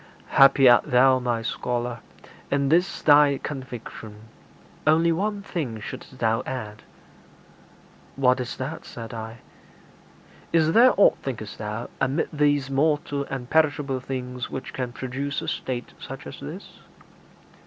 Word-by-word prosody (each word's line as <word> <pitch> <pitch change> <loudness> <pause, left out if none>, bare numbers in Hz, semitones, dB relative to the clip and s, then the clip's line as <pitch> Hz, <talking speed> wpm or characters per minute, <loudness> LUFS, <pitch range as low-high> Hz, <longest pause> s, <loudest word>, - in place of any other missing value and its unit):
'Happy 135 -1 +6
art 120 -1 +6
thou, 130 -1 +4
my 120 -2 -1
scholar, 120 0 -3 0.5
in 140 -1 +1
this 175 +5 +1
thy 145 -1 +6
conviction; 120 -6 -7 0.7
only 165 +2 +4
one 200 +4 -1
thing 140 - -4
shouldst 130 +4 -9
thou 115 -1 +1
add.' 110 -5 -5 1.3
'What 130 -1 +3
is 125 -1 -4
that?' 140 +5 -5
said 115 0 -9
I. 115 0 -7 1.1
'Is 160 -1 +3
there 245 +4 +6
aught, - - +5
thinkest 110 -6 -6
thou, 105 +2 -4
amid 135 +5 0
these 145 -2 +2
mortal 145 0 0
and 130 -3 -6
perishable 145 -3 +1
things 125 -1 -5
which 130 - -6
can 125 -2 -3
produce 135 +3 -4
a - - -6
state 125 -2 -4
such - - -8
as - - -9
this?' - - -9
130 Hz, 130 wpm, -24 LUFS, 120-145 Hz, 1.3 s, Happy